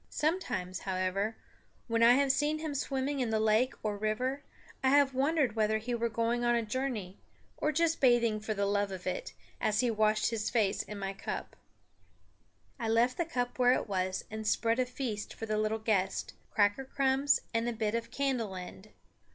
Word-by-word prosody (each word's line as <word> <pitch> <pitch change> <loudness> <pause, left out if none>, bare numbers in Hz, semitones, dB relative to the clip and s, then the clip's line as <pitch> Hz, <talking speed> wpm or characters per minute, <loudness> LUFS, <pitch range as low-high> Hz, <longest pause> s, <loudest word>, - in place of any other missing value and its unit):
Sometimes, 250 - -1
however, 190 +3 -1 0.5
when 230 -1 +1
I 235 +1 +8
have 275 0 +4
seen 295 +3 +1
him 310 -1 -4
swimming 275 0 -1
in 245 -3 0
the 220 0 +1
lake 220 +4 +2
or 210 -1 -1
river, 250 +6 -1 0.4
I 260 - +4
have 280 -1 +4
wondered 275 -3 +1
whether 220 0 +2
he 230 +3 -4
were 235 0 0
going 230 +2 0
on 240 0 +3
a 235 - +1
journey, 220 -6 -3 0.4
or 305 - 0
just 330 +2 +1
bathing 235 -4 +4
for 215 0 -3
the 200 0 0
love 205 0 +1
of 185 -2 -7
it, - - -3 0.3
as 215 +1 +2
he 245 -2 +1
washed 215 0 +2
his 220 -2 -1
face 215 -4 +1
in 210 - -8
my 195 -1 -3
cup. 195 - -5 1.2
I 230 - -2
left 235 +3 +3
the 345 - 0
cup 245 -6 -3
where 250 0 +6
it - - -1
was 185 -1 -2
and 220 0 -4
spread 230 +2 +2
a 255 - +2
feast 250 -5 -4
for 225 - -5
the 215 -1 -1
little 215 +1 0
guest, 210 -4 0 0.2
cracker 205 +5 +2
crumbs 270 +1 +2
and 230 +1 +1
a - - -1
bit 220 -2 -1
of 230 0 -2
candle 245 -7 -1
end. 185 +3 -9
230 Hz, 190 wpm, -31 LUFS, 215-265 Hz, 1.2 s, I